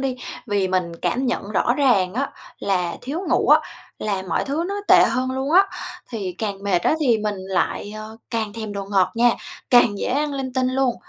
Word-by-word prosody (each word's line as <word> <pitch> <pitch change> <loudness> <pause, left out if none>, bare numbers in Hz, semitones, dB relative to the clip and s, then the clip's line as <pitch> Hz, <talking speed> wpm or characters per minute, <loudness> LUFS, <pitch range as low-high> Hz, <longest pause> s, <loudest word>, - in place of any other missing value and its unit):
đi, 260 -2 -1 0.3
vì 200 -3 +1
mình 175 -2 -1
cảm 240 +10 0
nhận 210 -4 -2
rõ 240 +4 +2
ràng 205 -10 +3
á 275 +3 -1 0.3
là 180 -3 -1
thiếu 280 +7 -3
ngủ - - +2
á - - +7 0.4
là 200 -3 -2
mọi - - 0
thứ 295 +5 -1
nó 400 - -2
tệ - - +8
hơn 255 0 0
luôn 265 +3 -2
á, 380 +3 +8 0.5
thì 200 -6 -4
càng 200 -3 -3
mệt 195 -3 +2
á - - +3
thì 240 -7 +3
mình 210 -1 -2
lại, 190 +2 -2
à, 215 - -6 0.3
càng 220 -3 -2
thèm 220 -1 -5
đồ 200 -1 -4
ngọt 195 -2 +1
nha, 240 +1 +5 0.4
càng 240 -5 +5
dễ - - -2
ăn 290 +3 0
linh 265 -2 -4
tinh 255 0 +1
luôn. 260 -2 +1
225 Hz, 210 wpm, -22 LUFS, 195-260 Hz, 0.5 s, tệ